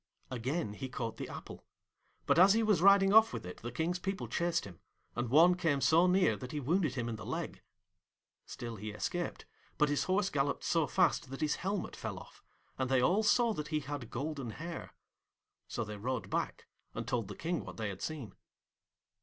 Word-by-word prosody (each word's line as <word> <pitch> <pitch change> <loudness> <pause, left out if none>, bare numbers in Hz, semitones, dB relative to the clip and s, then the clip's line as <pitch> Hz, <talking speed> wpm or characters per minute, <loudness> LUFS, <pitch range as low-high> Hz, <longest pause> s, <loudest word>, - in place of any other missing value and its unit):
Again 125 -1 -2
he 130 +5 -6
caught 115 -3 -4
the - - -5
apple; - - -9 0.6
but - - +4
as 190 +2 +8
he 225 +1 +2
was 210 -6 +3
riding 195 +1 +6
off 220 +1 +7
with - - -5
it 90 - -7
the 120 - -6
King's 165 +7 -1
people 195 +2 -3
chased 170 -1 0
him, 90 -5 -11 0.4
and 120 -1 -2
one 165 +7 +7
came 165 -6 +1
so 165 +5 +5
near 180 - +4
that 125 +2 -7
he 150 - -2
wounded 155 0 +1
him 120 -2 -2
in 115 -2 -3
the - - -8
leg. - - -4 0.9
Still 115 -2 -6
he 105 +2 -5
escaped, 175 +11 -3 0.3
but 150 -1 +3
his 145 - +1
horse 195 +1 +1
galloped 140 0 0
so 165 -3 +2
fast 175 -7 +2
that 135 - -7
his 150 -1 +1
helmet 195 +1 -3
fell - - -5
off, - - -13 0.4
and 130 -1 0
they 130 -1 +4
all 180 +11 +3
saw 230 +2 +3
that 150 -5 -4
he 155 -1 -1
had 140 -4 -6
golden 140 -1 -4
hair. 165 +8 -7 0.7
So 120 - -3
they 105 -1 -6
rode 115 -3 -3
back, - - -2 0.3
and - - -4
told 115 -5 -1
the 105 - -7
King 170 0 -2
what - - -9
they 110 -2 -2
had 95 -1 -7
seen. 140 -11 -5
150 Hz, 205 wpm, -33 LUFS, 120-180 Hz, 0.9 s, as